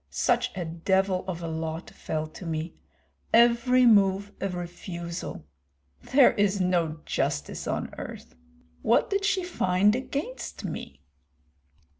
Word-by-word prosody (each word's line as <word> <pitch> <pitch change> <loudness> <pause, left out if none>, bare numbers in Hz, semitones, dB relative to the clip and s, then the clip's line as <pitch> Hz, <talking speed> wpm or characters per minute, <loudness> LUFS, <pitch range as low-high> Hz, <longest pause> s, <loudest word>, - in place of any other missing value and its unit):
Such 245 +1 +1
a 175 - -2
devil 185 +3 +1
of 175 -2 -4
a - - -3
lot 160 +1 -4
fell 155 -1 -3
to 155 +4 -11
me, 160 0 -3 0.6
every 240 +2 +5
move 200 -2 +4
a 195 - 0
refusal! 175 - -6 0.6
There 270 -1 +5
is 205 -1 +1
no 170 -4 0
justice - - -2
on - - -2
earth. - - -8 0.5
What 230 - +2
did 395 0 +1
she 385 -2 +1
find 205 - +2
against 280 - -5
me?" 70 - -7
190 Hz, 125 wpm, -27 LUFS, 170-235 Hz, 0.6 s, every